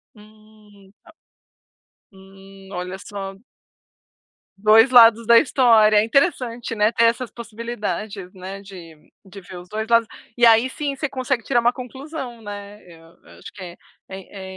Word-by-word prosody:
Hum, 210 -2 -20
a - - -26 1.1
Hum. 195 0 -16
Olha 180 0 -6
só. 195 -1 -8 1.2
2 220 +4 +5
lados 230 -2 +6
da 235 0 +7
história. 230 -6 +4
É 210 - +4
interessante, 240 -2 -1
né, 210 0 +2
ter 230 0 +2
essas 235 +1 0
possibilidades, 215 -4 -6
né, 190 +1 -9
de 180 -5 -13 0.3
de 195 +1 -12
ver 180 0 -11
os 175 0 -13
2 220 +2 -4
lados, 230 -1 +3 0.3
e 240 - +4
aí 230 +2 +5
sim, 285 +1 -4
você 295 +2 -3
consegue 255 -2 -3
tirar 245 0 +1
uma 240 +1 +2
conclusão, 260 -1 -8
né. 205 0 -10
Eu 165 -1 -18
eu - - -18
acho - - -11
que 195 - -11
é 175 -1 -10 0.3
é 190 0 -10
215 Hz, 150 wpm, -21 LUFS, 195-235 Hz, 1.2 s, da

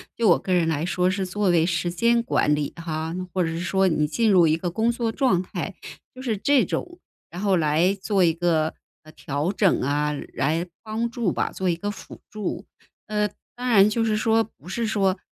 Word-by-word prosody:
就 225 -4 +2
我 170 - +6
个 185 - -2
人 170 -2 +3
来 160 0 0
说 180 0 +1
是 190 0 -1
作 195 +1 0
为 165 -2 +4
时 175 0 -1
间 235 +6 +2
管 150 -9 +1
理 150 -1 -2
哈， 160 0 -4 0.2
或 185 - 0
者 165 - -1
是 165 +1 -4
说 190 +2 +1
你 150 -3 +1
进 215 +8 +1
入 180 -4 +6
一 155 0 +3
个 175 +2 -3
工 220 +7 +1
作 235 -1 -2
状 240 -8 +2
态， 185 - -5 0.4
就 255 - -10
是 230 -6 -1
这 280 +4 +3
种， 350 0 -4 0.3
然 175 +3 -6
后 200 -2 +2
来 165 +5 +2
做 195 0 +1
一 165 -2 +4
个 165 -2 +1 0.4
调 145 +5 -2
整 195 -2 +2
啊， 145 +2 0 0.2
来 160 +6 0 0.2
帮 225 +2 -2
助 235 -6 -1
吧， - - -1
做 190 - -3
一 170 - +2
个 205 +4 -4
辅 205 - -10
助。 215 -2 -4 0.4
呃， 210 -1 0 0.3
当 250 +1 -5
然 210 -4 +6
就 225 +1 0
是 215 -1 +1
说 225 +1 +2
不 180 - -15
是 230 +5 -2
说， 200 -3 +1
185 Hz, 225 characters per minute, -24 LUFS, 165-220 Hz, 0.4 s, 我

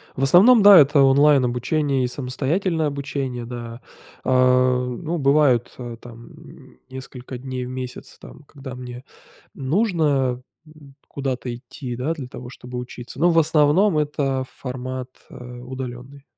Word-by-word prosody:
В 135 - -2
основном, 200 - +6
да, 200 -1 +10
это 145 -1 +5
онлайн 140 0 +5
обучение, 130 +3 0
и - - +1
самостоятельное 150 +7 -1
обучение, 140 -4 -4
да. 120 0 -8 0.4
А, 125 0 +3
ну, 160 +7 -4
бывают 140 -4 +2 0.3
там 115 -1 -13 0.6
несколько 130 -1 -9
дней 130 0 -5
в - - -7
месяц 130 -1 -7
там 145 - -14
когда 135 -3 -10
мне 125 0 -9 0.5
нужно 145 - 0 0.3
н 150 -3 -17
куда-то 130 -3 -4
идти, 120 +1 -8
да, 130 +7 -2
для 140 -6 -7
того 125 -1 -10
чтобы 125 -1 -9
учиться, 125 +1 -8
но 175 +2 +4
в 165 - +4
основном 155 +4 +3
это 140 -3 -1 0.2
формат, 130 0 -5 0.2
э, 125 0 -10
удаленный. 130 +1 -8
130 Hz, 135 wpm, -22 LUFS, 125-150 Hz, 0.6 s, да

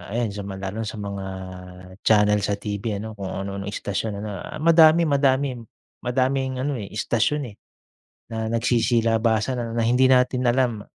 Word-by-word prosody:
ayan 120 -3 0
sa 100 0 -6
ma 95 - -5
lalo 95 +1 -5
na 110 - -4
sa 110 - -6
mga 100 -1 -5 0.8
channel 105 -1 +4
sa 100 +1 0
TV, 105 +1 -4
ano 110 +2 -6
kung 100 - -5
ano-anong 100 0 -5
istasyon, 100 0 -3
ano. 105 - -4
Ah, - - -7
madami, 165 0 +6
madamim 140 -3 +1 0.4
madaming 130 +1 0
ano, 140 -4 -2
eh, 100 - -6
istasyon, 120 +4 -1
eh, - - -18 0.8
na 110 0 -2
nagsisilabasan 115 0 +1
na - - +2
hindi 125 +2 +4
natin 125 0 +3
alam 120 -4 +1
115 Hz, 160 wpm, -23 LUFS, 105-130 Hz, 0.8 s, madami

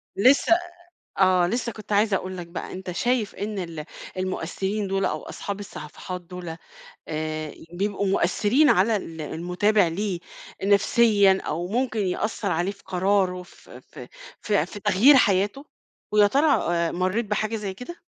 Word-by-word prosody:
لسه، 260 +10 +5 0.4
آآ، - - -4 0.2
آه، - - +3
لسه 235 +4 -2
كنت 215 -1 -9
عايزة 205 0 +3
أقول 185 0 -5
لك 175 -1 -6
بقى، 170 - -7
أنت 185 0 -6
شايف 235 +3 0
إن 205 0 -4
ال 165 -4 -5 0.3
المؤثرين 190 +2 -2
دولَ 195 0 0
أو - - -1
أصحاب 200 0 -6
الصفحات 180 0 -7
دولَ، 175 -2 -8 0.5
آآ 155 -1 -4 0.2
بيبقوا 200 +1 -1
مؤثرين 210 - +3
على 215 +5 +4
ال 165 -5 -5
المتابع 180 +5 +1
ليه 185 +1 -2 0.4
نفسيًا 200 -1 +4
أو 170 +4 -2
ممكن 230 +1 -1
يأثّر 200 +1 -1
عليه 175 +4 0
في 200 - -17
قرارُه 185 -1 +1
في 180 - -15
في - - -12 0.3
في 205 -7 +1
في 205 - -9
تغيير 210 +8 +6
حياته؟ 205 +4 +2 0.5
ويا 210 -1 +5
ترى 280 +8 +2 0.3
آآ، 170 -1 0
مرّيت 185 +6 0
بحاجة 215 +2 -1
زي 200 -3 -4
كده؟ 250 - -10
195 Hz, 150 wpm, -24 LUFS, 180-215 Hz, 0.5 s, تغيير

